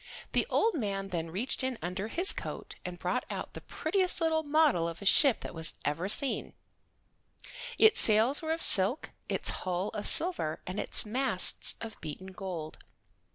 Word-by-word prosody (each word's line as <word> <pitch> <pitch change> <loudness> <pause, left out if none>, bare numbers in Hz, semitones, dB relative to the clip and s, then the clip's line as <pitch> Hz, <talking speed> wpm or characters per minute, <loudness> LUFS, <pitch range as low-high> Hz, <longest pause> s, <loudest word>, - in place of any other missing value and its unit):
The - - 0
old 450 0 +1
man 195 -8 -4
then 165 -3 -4
reached 225 +10 -2
in 260 -2 -3
under 185 +4 -5
his 355 - +3
coat - - -8
and 180 -1 -7
brought 180 +8 -3
out - - -7
the - - -10
prettiest 365 +3 -1
little 320 -1 0
model 295 - +1
of 170 0 -7
a 200 - -10
ship 270 +5 +4
that - - -8 0.3
ever 150 +4 -2
was 200 - +8
seen. 280 -2 -1 1.2
Its 440 - +4
sails 225 +6 +4
were 320 0 -4
of 325 +1 -1
silk, 200 +9 +4 0.2
its - - -1
hull 185 +2 -3
of 210 -2 -4
silver, 315 - +1
and 185 +3 -6
its - - +2
masts 235 -3 +2
of 225 -2 -9
beaten 175 +5 -9
gold. 180 -5 -8
210 Hz, 170 wpm, -29 LUFS, 180-290 Hz, 1.2 s, was